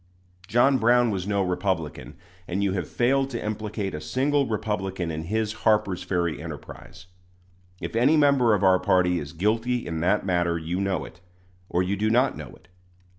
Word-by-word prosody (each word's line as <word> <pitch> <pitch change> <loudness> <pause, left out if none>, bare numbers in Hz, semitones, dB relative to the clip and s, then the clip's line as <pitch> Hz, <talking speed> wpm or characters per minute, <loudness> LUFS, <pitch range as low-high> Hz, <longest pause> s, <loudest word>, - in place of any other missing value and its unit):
John 120 +5 +3
Brown 120 0 +4
was 95 -1 -3
no 100 -1 +1
Republican; 90 -3 -3 0.3
and 95 +3 -1
you 100 - +1
have 90 -5 -3
failed 135 +3 +1
to 120 -4 -5
implicate 105 -2 -3
a 75 - -5
single 140 - 0
Republican 95 -5 -2
in 80 +1 -5
his 110 +3 -1
Harper's 105 -5 +2
Ferry 85 -4 -2
enterprise. 85 +3 -10 0.7
If - - -6
any 135 +7 +4
member 140 -6 +4
of 100 - -2
our 95 -1 +5
party 90 -1 +2
is 70 -2 -7
guilty 115 +8 0
in 80 -1 -4
that 95 +5 +1
matter 85 -2 +1
you 85 +3 -3
know 95 -4 -1
it, 90 - -14 0.5
or 90 - +1
you 95 +2 -1
do 105 +2 0
not 125 +4 +2
know - - -8
it. - - -23
100 Hz, 175 wpm, -25 LUFS, 90-115 Hz, 0.7 s, our